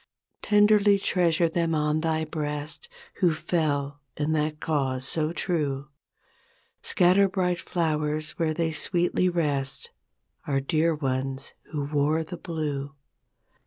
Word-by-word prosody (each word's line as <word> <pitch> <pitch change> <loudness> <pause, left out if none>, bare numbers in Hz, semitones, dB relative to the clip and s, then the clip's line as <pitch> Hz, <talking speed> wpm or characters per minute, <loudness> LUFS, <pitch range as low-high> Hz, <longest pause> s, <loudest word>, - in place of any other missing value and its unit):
Tenderly 210 -1 +5
treasure 175 -3 +2
them 165 0 0
on 150 0 +1
thy 160 -1 0
breast 150 - -4 0.3
Who 175 -5 +3
fell 145 -4 -1 0.2
in 150 +1 0
that 150 0 -1
cause 135 -4 -1
so 155 +1 +1
true; 150 -6 -2 0.9
Scatter 190 +2 +4
bright 180 -2 0
flowers 155 -2 -1
where 160 -2 -1
they 165 -1 0
sweetly 175 +2 +1
rest— 150 - -2 0.6
Our 140 -2 +1
dear 155 +4 +1
ones 135 -1 -3
who 150 -2 -4
wore 150 +2 +1
the 175 +3 -7
blue. 145 -5 -4
155 Hz, 120 wpm, -26 LUFS, 145-175 Hz, 0.9 s, Tenderly